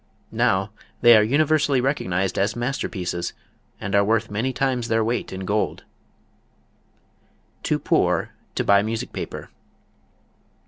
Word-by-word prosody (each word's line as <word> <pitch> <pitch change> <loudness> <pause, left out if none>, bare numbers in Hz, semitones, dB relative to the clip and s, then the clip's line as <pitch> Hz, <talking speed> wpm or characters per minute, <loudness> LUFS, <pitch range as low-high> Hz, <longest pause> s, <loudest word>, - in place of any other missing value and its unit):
Now 95 +2 +1 0.3
they 120 -1 +8
are 110 - +6
universally 145 +3 +2
recognized 95 -9 -1
as 100 +3 +1
masterpieces 95 -8 -3 0.5
and 95 - -5
are 100 0 +5
worth 110 +1 0
many 115 +6 -1
times 130 -3 -1
their 115 0 +2
weight 120 +2 -2
in 95 0 -5
gold. 105 +2 -1 1.8
Too - - 0
Poor - - +1 0.2
to - - 0
Buy 100 0 +5
Music 110 +2 -4
Paper. - - -6
110 Hz, 125 wpm, -23 LUFS, 100-125 Hz, 1.8 s, they